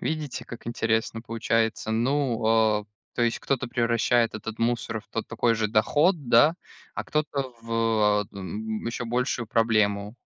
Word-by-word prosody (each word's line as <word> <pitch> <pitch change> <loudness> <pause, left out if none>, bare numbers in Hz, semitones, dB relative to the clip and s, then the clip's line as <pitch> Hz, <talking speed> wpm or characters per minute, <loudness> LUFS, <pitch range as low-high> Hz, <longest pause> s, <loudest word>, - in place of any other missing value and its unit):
Видите, 155 -4 -3
как 120 - -10
интересно 115 -1 -1
получается, 115 -1 -1
ну, 115 -3 +2
э, - - -19 0.3
то 120 - 0
есть 120 0 +1
кто-то 130 -2 -1
превращает 115 -1 +2
этот 110 +1 -6
мусор 120 +1 -1
в - - -28
тот - - -4
такой 115 -1 +1
же 110 -1 0
доход, 145 - +2
да, 125 +8 +6 0.4
а - - -4
кто-то 140 -4 -2
в, 110 -2 +2
э, - - -21
т - - -10
н 110 +4 -5
ещё 120 +1 -3
большую 120 0 -1
проблему. 105 -2 +1
115 Hz, 160 wpm, -26 LUFS, 110-120 Hz, 0.4 s, да